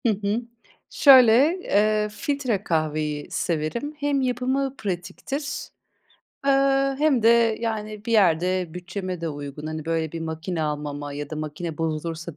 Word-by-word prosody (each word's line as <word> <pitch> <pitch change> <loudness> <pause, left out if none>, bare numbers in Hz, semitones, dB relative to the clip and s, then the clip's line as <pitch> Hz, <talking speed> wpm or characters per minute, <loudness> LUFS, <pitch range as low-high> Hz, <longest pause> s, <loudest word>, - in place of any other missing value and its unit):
Hı - - +5
hı. 205 +4 0 0.5
Şöyle: 260 -5 +7 0.3
Eee, 210 +1 +2
filtre 255 - -2
kahveyi 155 -3 -1
severim. 170 - -2
Hem 285 -1 +1
yapımı 260 +2 -1
pratiktir, 220 - -4 0.8
eee, - - +5 0.5
hem 290 -6 +3
de, 230 -1 +4
yani, 215 -2 -4
bir 230 - -2
yerde 180 -3 +2
bütçeme 185 0 -5
de 165 - -2
uygun. 145 0 -7
Hani, 155 -1 -5
böyle 160 -1 -1
bir 165 - -5
makine 160 +1 -3
almama 145 -1 -4
ya 145 0 -6
da 155 - -4
makine 155 +1 -5
bozulursa 165 0 -3
180 Hz, 135 wpm, -24 LUFS, 155-230 Hz, 0.8 s, Şöyle